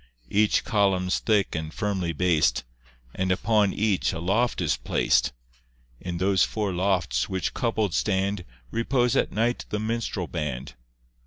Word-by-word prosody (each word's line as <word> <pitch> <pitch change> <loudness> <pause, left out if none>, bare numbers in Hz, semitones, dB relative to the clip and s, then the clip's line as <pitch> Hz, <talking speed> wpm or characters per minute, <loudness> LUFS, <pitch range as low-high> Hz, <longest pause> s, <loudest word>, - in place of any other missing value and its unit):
Each 105 +1 +3
column's 95 -5 +1
thick 105 -3 +1
and 80 -1 -4
firmly 95 -3 -2
bas'd, 85 -1 +2 0.5
And 95 0 -1
upon 105 +1 +2
each 105 -3 +1
a 80 - -4
loft 105 +8 +1
is 80 -5 +1
plac'd; - - +1 0.7
In 90 -1 -4
those 95 +1 +3
four 105 -3 -1
lofts, 90 -9 0
which 95 -1 -2
coupled 110 -6 0
stand, 95 +3 0 0.3
Repose 120 +1 +1
at - - +1
night 115 +3 0
the 105 - -2
minstrel 110 -4 -2
band. 70 -6 -4
95 Hz, 140 wpm, -26 LUFS, 90-110 Hz, 0.7 s, Each